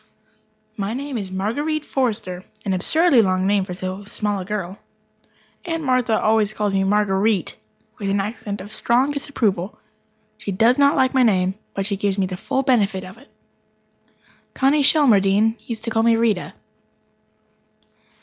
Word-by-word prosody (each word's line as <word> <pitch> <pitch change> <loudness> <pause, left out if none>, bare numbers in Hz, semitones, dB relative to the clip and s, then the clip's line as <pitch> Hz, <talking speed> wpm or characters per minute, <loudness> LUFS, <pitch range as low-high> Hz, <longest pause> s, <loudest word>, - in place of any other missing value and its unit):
My 205 +2 -3
name 280 +1 -5
is 200 -5 -4
Marguerite 285 +12 -2
Forrester 210 -8 -2 0.2
an 195 - 0
absurdly 285 - +4
long 185 -2 +1
name 200 -1 +2
for 180 -2 -6
so 185 +2 -5
small 205 0 -2
a 185 - -6
girl. 195 -1 -5 0.8
Aunt 330 -2 -3
Martha 255 -4 +1
always 215 -1 +2
calls 210 -2 -1
me 195 - +2
Marguer_ite_, 200 -1 +1 0.5
with 200 -2 -2
an 200 +1 +1
accent 205 -1 -4
of 205 +3 -10
strong 245 +5 +1
disapproval. 215 -10 -2 0.6
She 200 - -4
does 230 +7 +3
not 280 0 +4
like 260 0 +2
my 260 - +3
name, 190 -5 +2 0.2
but 195 - -2
she 200 -1 -2
gives 200 -1 -1
me 195 - +1
the 185 0 -5
full 265 +8 -2
benefit 210 -8 +1
of 185 +5 -11
it. 280 - -20 1.3
Connie 275 +3 +3
Shelmardine 225 -7 +4
used 225 -2 -5
to 230 - -3
call 225 - +2
me 230 0 +4
Rita. 225 -5 0
210 Hz, 160 wpm, -21 LUFS, 195-250 Hz, 1.3 s, absurdly